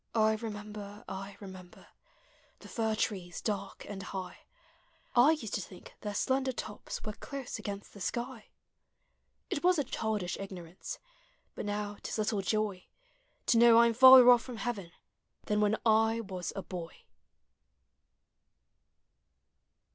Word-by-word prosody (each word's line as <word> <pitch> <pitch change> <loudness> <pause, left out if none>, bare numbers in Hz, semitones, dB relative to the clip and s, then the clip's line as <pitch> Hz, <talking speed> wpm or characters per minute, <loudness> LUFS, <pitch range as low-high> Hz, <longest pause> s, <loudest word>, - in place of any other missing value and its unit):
1 220 -1 +3
remember, 210 -1 -7
I 195 +1 -7
remember 185 -3 -11 0.7
The - - -13
fir 220 -2 -1
trees 185 -5 -2
dark 200 -2 -4
and 200 -2 -6
high; 185 -1 -6 0.8
I 255 +6 +7
used 230 -10 -5
to 205 - 0
think 185 0 -11
their 205 -1 -4
slender 260 +4 +1
tops 220 -4 -6
Were 215 - -4
close 270 0 -6
against 200 -1 -6
the 200 - -12
sky. 235 +3 -4 1.0
It 290 - -2
was 360 0 +5
a 290 - +2
childish 215 -7 -2
ignorance, 185 -3 -7 0.6
But - - -5
now 205 0 -3
't - - -6
is - - -3
little 210 -1 0
joy 205 -1 -1 0.6
To 230 - +4
know 235 -1 +8
I 235 - +8
'm 235 - +3
farther 260 +2 +10
otf 245 -1 +8
from 245 -2 -8
heaven 215 -8 -4 0.5
Thau 210 - 0
when 210 +1 +3
I 225 +1 +4
was 185 -4 -5
a 195 - -4
boy. 170 -3 -8
210 Hz, 140 wpm, -31 LUFS, 195-235 Hz, 1.0 s, farther